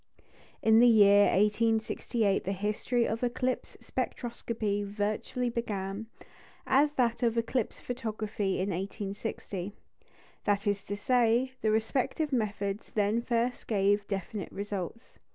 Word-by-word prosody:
In 220 0 +6
the 245 - +7
year 205 -3 +7
1868 220 0 +1
the 195 - -1
history 210 +5 0
of 225 +1 -2
eclipse 250 +1 -1
spectroscopy 220 -4 -3
virtually 210 +4 -2
began, 210 -2 -3 0.6
as 290 +2 +3
that 240 -3 +1
of 235 -1 +1
eclipse 230 0 -1
photography 215 -4 -3
in 190 +2 -1
1860; 195 0 -4 0.7
that 200 -1 +1
is 205 -1 +1
to 205 - -3
say, 245 +2 +2
the 220 - +2
respective 255 +7 0
methods 205 -3 -1
then 210 +2 +2
first 240 +1 -1
gave 205 -1 +2
definite 195 0 -4
results. 200 +2 -6
215 Hz, 115 wpm, -30 LUFS, 200-235 Hz, 0.7 s, the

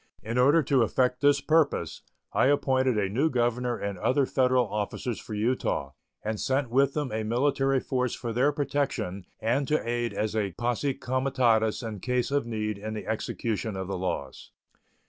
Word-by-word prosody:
In 115 +3 -1
order 145 +6 +5
to 135 -1 +3
effect 125 +2 +1
this 145 -1 +4
purpose, 145 - +1 0.3
I - - +4
appointed 130 -3 +2
a 100 -2 +1
new 130 +11 +1
governor 120 -1 0
and 100 -2 -4
other 135 +1 +2
Federal 125 -2 +2
officers 105 +3 -3
for 110 - -7
Utah 105 - -1 0.3
and 110 0 -2
sent 130 -2 0
with 135 +2 +3
them 145 -5 -1
a 110 +1 -1
military 135 +4 +1
force 125 -2 -1
for 115 -2 -4
their 130 +5 +3
protection 135 -10 -2
and 130 +5 0
to 155 -5 0
aid 120 0 -1
as 110 0 -2
a 100 -4 -1
posse 120 - -1
comitatus 125 -4 +1
in 110 -3 -5
case 125 +4 -1
of 140 -4 0
need 110 -2 -3
in 110 +1 -5
the 105 - -6
execution 110 -1 -2
of 95 -1 -4
the 95 - -3
laws. 70 -7 -4
120 Hz, 175 wpm, -27 LUFS, 110-135 Hz, 0.3 s, order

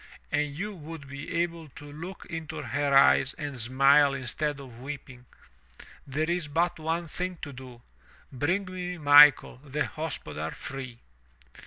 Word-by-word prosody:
If 145 -1 -1
you 210 +4 -4
would 160 -4 -9
be 140 +4 -8
able 165 -2 -6
to 145 - -10
look 170 +6 -8
into 160 -2 -6
her 145 -1 +2
eyes 135 0 +5
and 145 -4 -6
smile 135 +4 +4
instead 145 +3 -2
of 125 -4 -11
weeping, 130 -2 -9 0.8
there 150 +4 -1
is 175 -2 -1
but 165 +3 0
one 165 +2 -2
thing 180 +2 -4
to 145 -3 -6
do 125 -2 -12 0.2
— - - -28
bring 175 +10 0
me 180 -1 -5
Michael, 145 -3 +7
the 145 +2 -3
hospodar, 155 -2 -5
free!" 130 -3 -7
145 Hz, 150 wpm, -28 LUFS, 135-165 Hz, 0.8 s, Michael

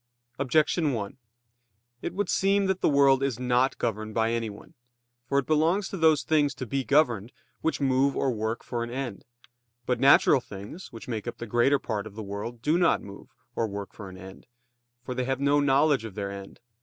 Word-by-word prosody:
Objection 150 +3 +2
1: 100 -2 -4 0.8
It 175 - -5
would 205 -1 -1
seem 195 +2 +2
that 190 -1 -1
the - - +3
world 140 -2 +4
is 135 -4 -1
not 125 +1 +1
governed 110 -2 -3
by 115 0 +2
anyone. 115 +2 -5 0.6
For 140 - +1
it 140 - +2
belongs 165 +6 +2
to - - -5
those 160 -3 +4
things 145 -3 +2
to 130 - -5
be 135 +3 -2
governed, 125 -7 +2 0.3
which 160 - -1
move 135 0 +2
or 135 - +1
work 110 0 -3
for 120 -1 -3
an 120 - -5
end. 125 -4 -5 0.6
But 125 - 0
natural 135 -1 +6
things 105 - -10
which 115 - -10
make 115 -2 -4
up 120 - -5
the 120 - -6
greater 120 +5 +3
part 110 -5 -4
of 100 - -13
the 110 - -6
world 105 +4 -6
do 155 +5 +2
not 175 - +3
move, 100 0 -11 0.3
or 115 - 0
work 100 -1 -6
for 100 -3 -9
an 95 - -11
end; 95 +3 -12 0.6
for 125 - -4
they 125 0 -2
have 135 0 -1
no 140 +1 +3
knowledge 140 -2 +3
of 110 -4 -8
their 100 -2 -3
end. 100 0 -9
125 Hz, 205 wpm, -27 LUFS, 110-145 Hz, 0.8 s, natural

